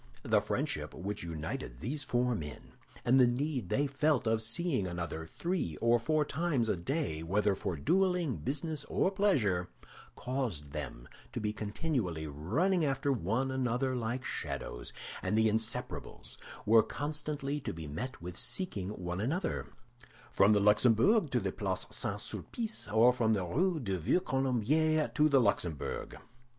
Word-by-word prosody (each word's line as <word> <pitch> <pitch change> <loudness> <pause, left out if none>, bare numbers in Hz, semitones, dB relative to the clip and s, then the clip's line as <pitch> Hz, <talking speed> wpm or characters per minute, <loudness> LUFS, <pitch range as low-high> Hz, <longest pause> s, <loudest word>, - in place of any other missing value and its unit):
The - - +3
friendship - - -2
which 100 +3 -4
united 80 -7 -5
these 145 - -3
four 125 0 +1
men, 75 -9 -6 0.3
and 130 +2 +5
the 125 - +7
need 125 - -1
they 145 - +2
felt 145 -1 +1
of 110 0 +2
seeing 115 - +1
another 85 -2 -4
three 170 - -2
or 115 +1 +4
four 155 +5 +1
times 145 -7 0
a - - +2
day, 85 - -2
whether 100 +5 +2
for 95 -2 -3
dueling, 180 - +1
business, 150 +3 -3
or 190 - +1
pleasure, 110 - +2 0.5
caused 120 - -3
them 70 -5 -6 0.3
to - - -2
be 105 0 -1
continually 105 - -2
running 120 - +1
after 140 -1 +1
one 125 +3 0
another 130 0 0
like 120 +2 -2
shadows; - - -4 0.3
and 105 - 0
the 110 0 +5
Inseparables 110 +1 -2 0.3
were 115 +1 +7
constantly 145 +1 -3
to - - -4
be 80 -1 -7
met 115 - -5
with 90 0 -6
seeking 105 - -2
one 90 -2 -4
another, 165 - -1 0.6
from 100 +2 +5
the 105 - +4
Luxembourg 115 - +4
to - - +1
the - - -2
Place - - -2
St. - - 0
Sulpice, 225 - -4
or 115 +3 +6
from 115 -3 +2
the 95 -4 0
Rue 170 - +1
du 100 -8 -2
Vieux 85 - +2
Colombier 145 - +2
to 150 +1 +4
the 140 -2 +5
Luxembourg. 90 - -1
120 Hz, 155 wpm, -32 LUFS, 95-145 Hz, 0.6 s, the